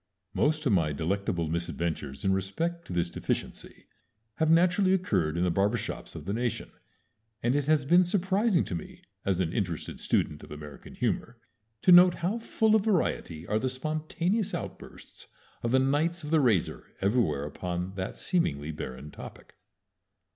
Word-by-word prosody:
Most 155 +1 +1
of 130 - +3
my 80 -6 +2
delectable 85 +2 -1
misadventures 80 -3 -3
in 95 - +3
respect 165 - -2
to - - -8
this 85 0 +1
deficiency - - -4 0.5
have 160 -1 +2
naturally 180 +3 +4
occurred 90 - 0
in 85 - +1
the 90 - +2
barber 100 +6 +2
shops - - -6
of - - -8
the 100 - -2
nation, 120 +1 -2 0.7
and 120 +3 +2
it 145 -1 0
has 155 -3 +3
been 175 +5 +6
surprising 190 +2 +2
to - - -5
me, 85 - -7 0.2
as 95 -2 +1
an 85 -2 0
interested 90 -7 -2
student 75 0 0
of - - -12
American 75 -1 -10
humor, 120 +1 -2 0.5
to 185 - +6
note 175 0 +8
how 190 +7 -1
full 220 -1 +2
of 215 - +3
variety 90 - 0
are 105 +3 0
the 130 - -1
spontaneous 155 - -1
outbursts - - -9 0.3
of 120 - -1
the 130 - +4
Knights 150 +6 +1
of 150 - -6
the 160 - +5
Razor 115 - +1 0.2
everywhere 95 - +1
upon 90 +4 -4
that 95 -1 -5
seemingly 80 - -1
barren 70 -1 -7
topic. - - -11
115 Hz, 165 wpm, -28 LUFS, -, 0.7 s, note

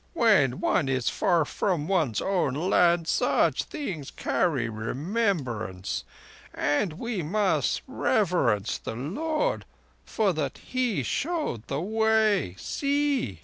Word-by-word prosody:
"When 190 - +4
one 135 - +1
is 130 -3 +1
far 170 -4 +2
from 160 +1 -1
one's 160 - +1
own 180 -9 0
land 170 0 +3
such - - +2
things 180 - -5
carry 145 -10 0
remembrance; 120 - -2 0.5
and 155 +4 0
we 220 +3 -3
must 165 - 0
reverence 175 - +1
the - - -6
Lord 310 - -1 0.4
for 205 -4 0
that 145 -4 -3
He 245 - -1
showed 300 - -2
the 140 +2 -2
Way. 220 - +2
See!" 280 - -1
175 Hz, 110 wpm, -27 LUFS, 135-220 Hz, 0.5 s, When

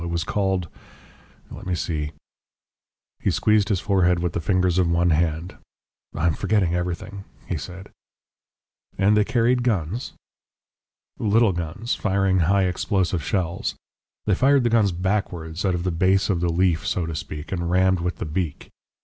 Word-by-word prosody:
It 85 - -3
was 85 -1 -1
called 95 0 -1 0.8
let - - -9
me 90 - 0
see 80 -3 -3 0.5
." - - -69
He - - +1
squeezed 105 -1 +2
his 100 -4 +1
forehead 90 -3 +2
with 85 0 -2
the - - -2
fingers 90 +1 +2
of 90 -2 +2
one 85 +1 +2
hand. 80 +2 -1 0.6
"I 75 - -1
am 85 - +3
forgetting 95 -1 +1
everything," 90 +3 -3 0.2
he 90 - -3
said. 90 +6 -8 1.1
"And 100 +2 +4
they 105 - +4
carried 120 +2 +2
guns?" 110 -2 -1 1.1
"Little 110 0 +3
guns, 85 +7 -3
firing 95 -2 +1
high 95 +4 +3
explosive 90 -2 0
shells. 90 -2 -2 0.5
They 100 - +2
fired 135 +6 +4
the 120 - +1
guns 110 -4 +3
backwards, 90 -2 -2
out 95 -2 +2
of 85 - -3
the 90 - 0
base 95 +4 +2
of 85 -3 -1
the 90 - +1
leaf, 85 -5 +1
so 85 - 0
to 80 - -4
speak, 75 0 -6
and 85 -2 -2
rammed 95 +1 +3
with 90 -1 -2
the - - -5
beak. 80 -1 -4
90 Hz, 165 wpm, -23 LUFS, 85-100 Hz, 1.1 s, And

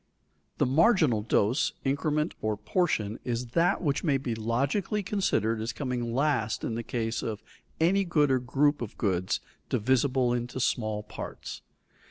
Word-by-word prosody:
_ - - -45
The - - +3
marginal 150 - +4
dose, 110 +5 +1
increment, 150 +3 0
or 110 -1 -1
portion 110 - 0
is 120 0 -3
that 175 - +2
which 145 -3 0
may 145 -6 +3
be 130 -3 -3
logically 135 - 0
considered 115 - 0
as 115 +1 -3
coming 125 -3 -3
last 120 -5 0
in - - -2
the 115 - -2
case 115 -1 -2
of 110 -2 -4 0.4
any 190 +5 +3
good 150 -6 +2
or 130 - +3
group 140 +4 +1
of 115 - -6
goods 95 -3 0 0.3
divisible 130 +1 +2
into 120 +1 -3
small 110 -4 0
parts. 105 - -7
125 Hz, 155 wpm, -28 LUFS, 115-150 Hz, 0.4 s, marginal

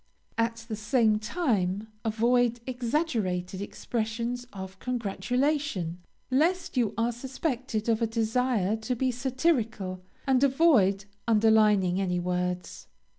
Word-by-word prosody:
At 230 0 -1
the 220 - -3
same 215 0 +2
time, 215 - 0 0.2
avoid 235 +2 +2
exaggerated 230 - -1
expressions 235 +3 -3
of 190 -1 -8
congratulation, 245 - -1 0.3
lest 335 +7 +1
you 225 -4 +1
are 230 +1 +2
suspected 255 -2 -3
of 225 0 +2
a 230 - +2
desire 225 -2 +1
to 225 +3 -2
be 255 +2 +1
satirical, 240 - -1 0.2
and 265 -1 +3
avoid 255 - +4 0.2
underlining 210 -4 +4
any 180 -2 0
words. 180 0 -3
230 Hz, 110 wpm, -28 LUFS, 200-250 Hz, 0.3 s, avoid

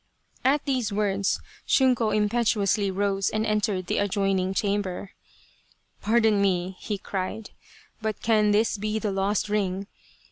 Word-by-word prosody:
At 280 +2 +2
these 255 -6 0
words 200 -1 0 0.3
Shunko 250 -4 +3
impetuously 210 -2 +1
rose 195 0 0
and 215 0 -1
entered 210 -3 0
the - - -1
adjoini 195 -2 +1
.g 190 - -2
chamber. 200 -2 -1 0.5
" - - -38
Pardon 220 -1 +3
me," 185 -1 0
he 210 - -3
cried, 195 +3 -5 0.2
" 435 - -27
but 220 -2 -2
can 215 -2 +3
this 210 0 +2
be 215 +1 -1
the 215 -2 -1
lost 195 +2 0
ring 200 -2 -1
205 Hz, 145 wpm, -26 LUFS, 195-220 Hz, 0.5 s, Shunko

